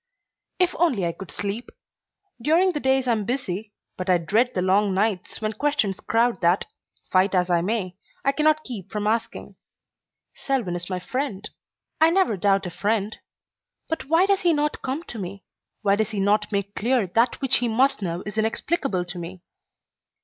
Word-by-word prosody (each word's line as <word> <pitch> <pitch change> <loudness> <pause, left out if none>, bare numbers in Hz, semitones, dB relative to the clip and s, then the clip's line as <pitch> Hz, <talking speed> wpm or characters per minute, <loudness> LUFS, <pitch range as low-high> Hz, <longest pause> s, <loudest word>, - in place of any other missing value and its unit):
If 365 -1 +3
only 260 - +2
I 170 - 0
could 190 +2 -10
sleep! 205 +4 -4 0.7
During 335 +8 +4
the 300 - -3
days 265 -1 +2
I - - +3
am 220 -2 +1
busy, 215 -3 -3 0.3
but 185 0 -4
I 180 - +5
dread 220 +9 +1
the 180 - +1
long 195 +1 +2
nights 200 -1 -1
when 215 0 -1
questions 215 -6 0
crowd 235 +2 +1
that, 175 +2 +3 0.5
fight 190 +1 +3
as 180 0 +2
I 170 -1 +3
may, 190 -2 -2 0.3
I 275 - +4
cannot 310 +2 +2
keep 205 -7 -8
from 210 -1 -2
asking. 225 +2 -2 0.8
Selwyn 245 -11 -2
is 175 +1 -5
my 185 - -1
friend. 210 0 -3 0.5
I 320 +1 +6
never 345 - +2
doubt 195 +1 +2
a 180 - -4
friend. 205 +3 -1 0.7
But 320 - -2
why 330 +6 +4
does 395 -1 +2
he 345 -2 +3
not 300 0 -1
come 270 +5 -3
to 235 - -7
me? 195 0 -6 0.4
Why 200 -1 +3
does 220 0 0
he 215 -2 -3
not 210 +2 +2
make 200 0 -2
clear 240 0 +1
that 230 +7 +1
which 270 -2 +3
he 245 - 0
must 250 +2 +2
know 175 -1 -3
is 210 +1 -3
inexplicable 220 - 0
to 175 0 -5
me? 175 +1 -8
215 Hz, 185 wpm, -24 LUFS, 190-265 Hz, 0.8 s, I